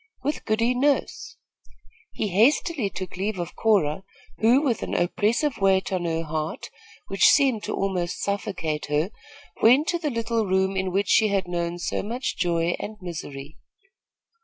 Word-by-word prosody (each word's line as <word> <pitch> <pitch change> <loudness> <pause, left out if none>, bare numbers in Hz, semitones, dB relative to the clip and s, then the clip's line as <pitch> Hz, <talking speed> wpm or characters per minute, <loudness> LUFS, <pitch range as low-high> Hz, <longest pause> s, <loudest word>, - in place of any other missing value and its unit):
"With 295 - -2
Goody 230 +2 +1
Nurse." 285 - -1 0.7
He 210 - -3
hastily 235 - +2
took 185 -1 -7
leave 200 +2 -2
of 175 -1 -5
Cora, 190 -6 +1 0.4
who, 235 +4 +5
with 250 -6 0
an - - -3
oppressive 225 - +1
weight 195 -1 +2
on 180 -2 -1
her 165 0 -1
heart, 155 0 -4 0.3
which 195 -1 +2
seemed 265 -6 +3
to - - -3
almost 180 -3 -2
suffocate 180 -6 -3
her, 150 +6 0 0.5
went 255 +7 +6
to 345 - 0
the 310 -3 -1
little 230 -3 -1
room 190 +1 +1
in 190 -1 -1
which 195 +1 0
she 220 - +5
had 195 -3 0
known 175 -1 -2
so 175 - -2
much 240 +5 -3
joy 170 0 0
and 215 0 -6
misery. 155 -5 -8
195 Hz, 160 wpm, -24 LUFS, 175-230 Hz, 0.7 s, went